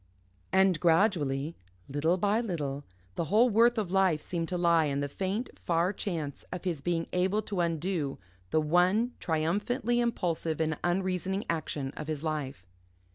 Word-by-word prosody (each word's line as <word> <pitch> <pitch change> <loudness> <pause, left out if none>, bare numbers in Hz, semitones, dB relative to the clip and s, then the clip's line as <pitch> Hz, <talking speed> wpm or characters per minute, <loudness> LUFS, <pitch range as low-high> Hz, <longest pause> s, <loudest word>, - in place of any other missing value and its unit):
And 190 -3 +4
gradually, 160 -5 +2 0.3
little 155 +6 +1
by 205 +4 +2
little, 145 - -3 0.3
the 165 - -2
whole 225 +8 +4
worth 235 +3 +4
of 200 -5 -1
life 190 -5 +3
seemed 165 +1 -4
to 180 - -1
lie 170 -2 +4
in 140 -1 -1
the 145 - -1
faint, 195 - -3
far 175 +3 +1
chance 160 -10 -4
of 180 - -5
his 170 -6 -2
being 165 +1 0
able 190 +4 +1
to 200 -2 -4
undo 165 -3 -1 0.3
the 155 - +2
one 180 +9 +3
triumphantly 205 +10 0
impulsive 170 -9 -1
and 160 -1 0
unreasoning 185 +2 0
action 150 -4 -3
of 155 - -6
his 155 -1 -3
life. 145 - -3
175 Hz, 155 wpm, -29 LUFS, 155-195 Hz, 0.3 s, And